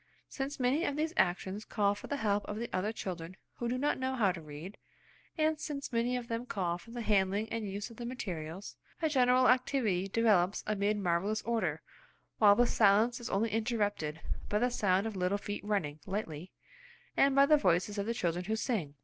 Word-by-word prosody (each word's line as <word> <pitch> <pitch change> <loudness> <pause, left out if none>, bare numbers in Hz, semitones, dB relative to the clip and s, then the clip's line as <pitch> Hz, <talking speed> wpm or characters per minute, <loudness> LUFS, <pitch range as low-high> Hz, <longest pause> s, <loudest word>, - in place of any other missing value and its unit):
Since 275 +1 -4
many 260 +6 +2
of 285 - -1
these 315 +2 -1
actions 190 +3 0
call 205 -3 +1
for 205 - -9
the 285 - -2
help 205 -4 +1
of 210 - -5
the 235 +1 -4
other 205 +4 0
children 185 -4 -6 0.2
who 240 - -2
do 250 - 0
not 290 +2 0
know 260 0 -1
how 210 -7 +3
to 175 -2 -7
read, 155 +6 -9 0.6
and 310 0 +1
since 280 -4 -5
many 240 +2 +1
of 240 -1 -6
them 235 +1 -3
call 175 -5 -1
for 230 - -16
the 235 0 -5
handling 200 0 +2
and 225 -3 -3
use 200 +4 -5
of 230 - -13
the 240 - -6
materials, 185 -7 -5 0.2
a 320 -2 +1
general 255 -2 +4
activity 250 -7 +2
develops 200 -3 +2
amid 210 0 0
marvellous 195 +3 0
order, 185 -10 -1 0.6
while 205 -2 +7
the 245 - +4
silence 220 +2 +3
is 240 - -6
only 215 +3 0
interrupted 205 -9 -1 0.3
by 210 - +1
the 245 +3 +1
sound 195 -3 +2
of 220 -2 -4
little 185 +2 +1
feet 205 0 -5
running 185 -8 -1
lightly, 185 -4 -4 0.6
and 275 0 +4
by 275 0 +7
the 305 +1 +6
voices 190 - +1
of 200 - -2
the 230 - -1
children 175 -2 -1
who 220 +3 0
sing. 205 - -2
210 Hz, 200 wpm, -32 LUFS, 190-245 Hz, 0.6 s, while